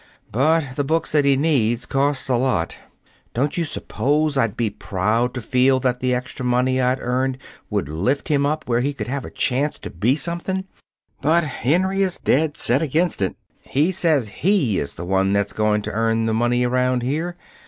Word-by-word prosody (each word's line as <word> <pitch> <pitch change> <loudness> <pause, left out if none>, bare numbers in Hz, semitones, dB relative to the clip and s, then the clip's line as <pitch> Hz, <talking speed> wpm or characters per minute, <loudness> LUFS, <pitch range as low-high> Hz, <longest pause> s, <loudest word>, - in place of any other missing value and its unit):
But 140 +2 +1
the 145 - +1
books 160 +4 0
that 150 -2 +3
he 140 -1 +4
needs 125 -6 +1
cost 140 0 0
a 130 - +2
lot. 120 -10 0 0.6
Don't 140 +5 0
you 170 - 0
suppose 150 -1 0
I'd 115 -6 0
be 115 -3 0
proud 105 +4 0
to 125 - -3
feel 130 +3 +3
that 125 -1 0
the 125 0 0
extra 125 +1 -3
money 125 +1 +2
I'd 125 +1 +1
earned 130 +1 -1 0.3
would - - -1
lift 95 - -1
him 145 -3 +2
up 155 +2 -1
where 120 -1 +2
he 140 +4 0
could 135 - -5
have 135 0 -3
a - - -7
chance 135 +4 -1
to - - -8
be 110 +10 +1
something! 175 +4 -3 0.6
But 160 +4 +3
Henry 180 - 0
is 190 -2 0
dead 150 +2 +1
set 130 +5 +3
against 160 - 0
it. 95 - 0 0.3
He 150 +7 +1
says 155 - +1
he 170 - +2
is 70 - -4
the 85 - -6
one 95 +1 +1
that's 100 0 0
going 105 -1 +1
to - - -4
earn 115 +1 +1
the 110 - 0
money 120 +2 +1
around 125 0 +1
here. 160 +7 -2
130 Hz, 195 wpm, -21 LUFS, 120-150 Hz, 0.6 s, he